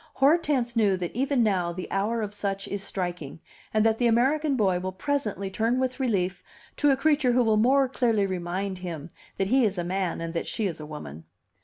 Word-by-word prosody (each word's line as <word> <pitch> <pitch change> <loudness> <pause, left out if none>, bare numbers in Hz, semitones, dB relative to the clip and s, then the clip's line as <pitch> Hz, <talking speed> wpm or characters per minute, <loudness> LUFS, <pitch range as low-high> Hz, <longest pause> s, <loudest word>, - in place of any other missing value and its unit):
Hortense 275 -4 +2
knew 205 -4 +3
that 180 +1 -5
even 265 0 +2
now 185 -5 +1
the 180 +1 -6
hour 215 +4 0
of 210 -1 -5
such 195 -1 -3
is 200 - -4
striking, 175 -6 -4 0.3
and 215 0 +2
that 225 0 +2
the 245 - +3
American 275 +6 +2
boy 190 -6 +2
will 185 +1 -3
presently 205 -3 -2
turn 230 +5 +1
with 260 0 -1
relief 190 -7 0 0.4
to 290 - +3
a 270 - +4
creature 290 -3 +2
who 250 0 +4
will 220 -2 +3
more 265 +5 +4
clearly 230 -5 +1
remind 185 +1 -3
him 170 -3 -6 0.3
that 195 0 0
he 260 +2 +4
is 205 -3 +1
a 175 - -1
man 185 0 -2
and 165 0 -4
that 165 - -3
she 220 - -2
is 175 -5 -3
a 150 - -8
woman. 80 - -9
205 Hz, 210 wpm, -26 LUFS, 185-250 Hz, 0.4 s, a